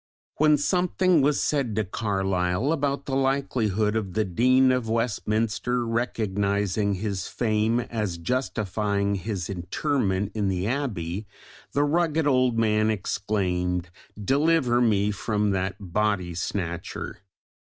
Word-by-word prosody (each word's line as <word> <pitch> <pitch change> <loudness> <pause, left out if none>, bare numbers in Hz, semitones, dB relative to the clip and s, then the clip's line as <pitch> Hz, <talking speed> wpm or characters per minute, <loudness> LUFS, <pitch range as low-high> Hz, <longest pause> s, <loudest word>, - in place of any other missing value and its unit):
When 150 0 +5
something 180 +1 +2
was 145 +1 +2
said 135 -8 0
to 110 - +1
Carlyle 95 - 0
about 140 -3 -1
the 135 - -2
likelihood 120 -6 +1
of 100 -5 -2
the 110 0 +1
Dean 130 +8 +4
of 125 -3 -1
Westminster 115 +1 0
recognising 105 -3 0
his 95 -2 -3
fame 110 +1 +1
as 105 -7 -3
justifying 100 -1 -1
his 95 -1 -3
interment 100 - -1
in 105 -2 -1
the 95 -1 -1
Abbey, 105 - -2 0.5
the 145 - +2
rugged 160 +1 +1
old 130 -4 +3
man 110 -1 +2
exclaimed, 90 -4 -1 0.3
"Deliver 135 - +2
me 105 -3 +2
from 105 0 0
that 95 0 -1
body 100 -2 -1
snatcher." 85 0 -4
110 Hz, 120 wpm, -25 LUFS, 95-130 Hz, 0.5 s, When